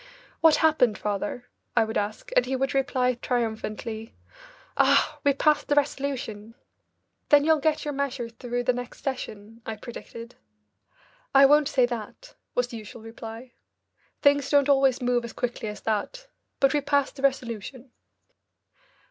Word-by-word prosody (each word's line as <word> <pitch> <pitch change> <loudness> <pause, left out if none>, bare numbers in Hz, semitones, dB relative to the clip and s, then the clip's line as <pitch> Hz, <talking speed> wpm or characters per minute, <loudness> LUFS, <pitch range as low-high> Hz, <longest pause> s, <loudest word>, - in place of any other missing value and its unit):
"What 320 -2 +6
happened, 250 -9 +3
father?" 210 +4 -3 0.3
I 225 - +6
would 220 0 -5
ask, 210 +1 -3
and 250 - +4
he 265 - -1
would 270 +1 -1
reply 255 -2 +1
triumphantly, 225 -2 -3 0.6
"Ah! - - +3
We 285 - +4
passed 295 +1 +2
the 290 - +2
resolution." 265 -7 -2 0.7
"Then 290 -1 +6
you'll 320 -1 +4
get 305 +1 0
your 295 - -2
measure 275 -3 -2
through 245 +1 -4
the 250 - +2
next 245 0 -7
session," 225 -4 -5
I 220 - -5
predicted. 230 +1 -10 1.0
"I 275 0 +9
won't 295 +1 +5
say 260 -4 +3
that," 240 - -7 0.2
was 245 0 +1
the 235 - -7
usual 220 +1 -10
reply. 225 +2 -9 0.7
"Things 285 -1 +4
don't 285 -1 +4
always 270 -2 +3
move 245 -1 +1
as 235 - -7
quickly 240 -3 -3
as 210 - -8
that. 225 - -2 0.3
But 275 0 +4
we 295 - +2
passed 280 0 0
the - - -7
resolution." 255 -1 -2
250 Hz, 150 wpm, -26 LUFS, 225-280 Hz, 1.0 s, I